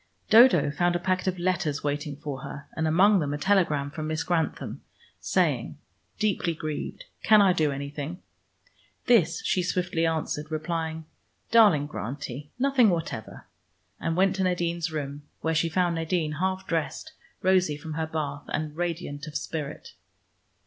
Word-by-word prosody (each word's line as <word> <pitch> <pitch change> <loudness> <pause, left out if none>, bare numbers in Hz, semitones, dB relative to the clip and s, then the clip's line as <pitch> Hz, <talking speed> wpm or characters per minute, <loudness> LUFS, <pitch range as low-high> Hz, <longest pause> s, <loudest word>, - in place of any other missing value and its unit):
Dodo 220 - +7
found 175 +4 +1
a - - +1
packet 185 +1 -1
of 185 -1 0
letters 175 -5 -1
waiting 145 0 -2
for 140 -2 -6
her 140 +1 -8
and 160 0 0
among 190 +5 +5
them 145 -2 -1
a - - -3
telegram 150 -5 +2
from 155 0 -5
Miss 155 0 -1
Grantham 170 -3 -2 0.4
saying, - - 0 0.4
"Deeply 195 -5 0
grieved. 155 - -5 0.2
Can 215 -1 +6
I 195 -3 +5
do 155 -4 +1
anything?" 140 +4 -5 0.9
This 190 -10 +3
she 185 - +2
swiftly 175 -2 0
answered, 155 -1 -2
replying, 160 0 -3 0.5
"Darling 205 -11 +6
Grantie. 145 +1 -6
Nothing 260 -3 +4
whatever," 165 - -4 0.5
and 165 0 -2
went 190 +1 +3
to 190 - +1
Nadine's 170 -2 0
room, 145 -2 -4 0.2
where 160 - 0
she 165 +1 +1
found 175 0 +1
Nadine, 165 -2 -1
half 190 +1 -1
dressed, 165 - -3 0.3
rosy 185 -5 +3
from 155 +1 -7
her 160 +1 -2
bath, 145 -3 -4
and 155 -1 -3
radiant 165 -4 -3
of 150 - -3
spirit. 150 -4 -6
165 Hz, 150 wpm, -27 LUFS, 150-185 Hz, 0.9 s, Dodo